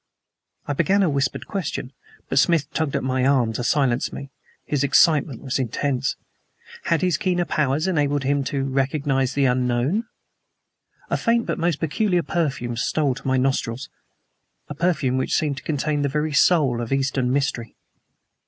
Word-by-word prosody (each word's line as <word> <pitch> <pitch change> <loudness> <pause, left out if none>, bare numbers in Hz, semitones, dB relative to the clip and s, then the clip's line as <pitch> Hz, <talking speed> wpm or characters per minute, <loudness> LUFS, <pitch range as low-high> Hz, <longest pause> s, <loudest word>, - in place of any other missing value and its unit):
I 145 - -2
began 190 +7 +2
a 180 - +2
whispered 140 -1 -1
question, 150 -8 -4 0.3
but 135 - +2
Smith 160 -2 +2
tugged 155 -3 -1
at - - -1
my 130 0 0
arm 130 -4 +2
to 120 - -3
silence 130 -2 +1
me. 140 0 -8 0.3
His 145 -2 0
excitement 140 -2 +3
was 135 -1 -2
intense. 130 +2 -1 0.7
Had 165 0 +1
his 180 -4 +2
keener 175 0 0
powers 150 0 0
enabled 145 -6 +1
him 140 +1 +1
to 135 0 -2
recognize 135 0 0
the 140 -1 +2
unknown? 125 - +1 1.1
A - - +2
faint 230 0 +1
but - - -3
most 170 -3 0
peculiar 175 +2 0
perfume 135 -9 -2
stole 140 +3 0
to 130 - -8
my 130 0 +2
nostrils, 130 -1 -1 0.8
a - - -4
perfume 140 -5 0
which - - 0
seemed 145 -3 0
to - - -8
contain 150 -1 -1
the 140 - 0
very 150 +2 -1
soul 145 -6 +3
of 115 - -5
Eastern 135 -2 0
mystery. 135 -4 -1
140 Hz, 160 wpm, -23 LUFS, 130-155 Hz, 1.1 s, excitement